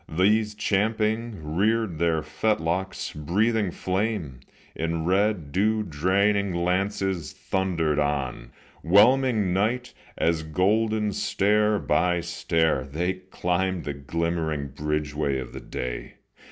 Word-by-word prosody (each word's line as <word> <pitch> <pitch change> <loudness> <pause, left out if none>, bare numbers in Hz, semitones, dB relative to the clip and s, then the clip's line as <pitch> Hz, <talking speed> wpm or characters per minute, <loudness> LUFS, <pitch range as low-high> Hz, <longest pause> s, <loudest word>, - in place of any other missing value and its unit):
These, 105 +5 +2
champing, 105 -4 -1
reared 110 -4 +1
their 80 -2 +1
fetlocks; 90 +2 -1
breathing 105 +7 +1
flame, 95 - -2 0.3
In 80 0 -2
red, 95 -4 +1
dew 110 +5 +1
draining 100 +3 +1
lances, 95 0 -1
thundered 85 -6 -1
on, 70 -5 -2 0.3
'Whelming 105 +1 +4
night, 120 +6 0 0.2
as 80 -1 +1
golden 105 +6 +1
stair 105 +2 +2
by 90 -3 +1
stair 80 -4 0
They 80 +7 -2
climbed 90 -1 -2
the 70 - -3
glimmering 80 0 -2
bridgeway 75 -1 -2
of 65 -2 -6
the - - -6
day. 60 -1 -5
90 Hz, 105 wpm, -25 LUFS, 80-105 Hz, 0.3 s, Whelming